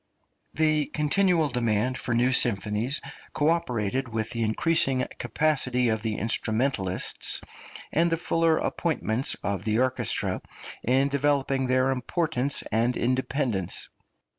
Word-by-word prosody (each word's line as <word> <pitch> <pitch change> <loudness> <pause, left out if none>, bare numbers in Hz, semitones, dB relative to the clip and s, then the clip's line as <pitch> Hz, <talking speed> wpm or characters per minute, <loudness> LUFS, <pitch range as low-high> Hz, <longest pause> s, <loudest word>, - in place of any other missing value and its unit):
The 155 -1 +2
continual 165 +1 +2
demand 120 0 0
for 120 -2 -2
new 125 +2 +3
symphonies 115 +2 +1 0.3
co 150 +1 +2
operated 130 -7 -1
with 110 0 -3
the 115 - -3
increasing 130 +3 +2
capacity 125 -1 0
of 110 -1 -1
the 110 -1 -2
instrumentalists, 110 -3 0 0.5
and 170 +1 +2
the 165 - +1
fuller 165 -1 +1
appointments 135 -7 0
of 100 -2 -2
the 110 0 0
orchestra, 130 +1 +1 0.4
in 130 +3 +2
developing 140 -1 0
their 130 +1 +2
importance 140 +1 0
and 120 +2 +1
independence. 130 - -1
130 Hz, 115 wpm, -26 LUFS, 115-145 Hz, 0.5 s, new